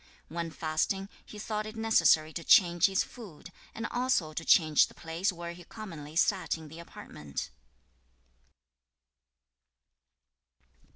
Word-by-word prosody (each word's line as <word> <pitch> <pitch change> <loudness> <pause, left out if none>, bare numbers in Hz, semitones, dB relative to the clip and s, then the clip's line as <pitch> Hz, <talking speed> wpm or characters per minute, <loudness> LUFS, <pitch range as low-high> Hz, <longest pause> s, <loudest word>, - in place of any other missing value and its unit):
2. - - -13
When 170 -1 -3
fasting, 165 +5 -2
he 210 - -12
thought 215 0 -3
it 215 - -9
necessary 220 -8 +3
to 170 - -5
change 175 -1 +5
his 195 -1 +1
food, 205 -11 -12 0.2
and 225 - -4
also 245 -11 0
to 165 - -4
change 155 -3 +5
the - - -18
place 170 +5 -2
where 170 -1 -7
he 175 0 -13
commonly 165 -7 -9
sat 185 0 +1
in 160 -1 -11
the 160 +3 -11
apartment. 75 - -8
170 Hz, 130 wpm, -30 LUFS, 160-210 Hz, 0.2 s, change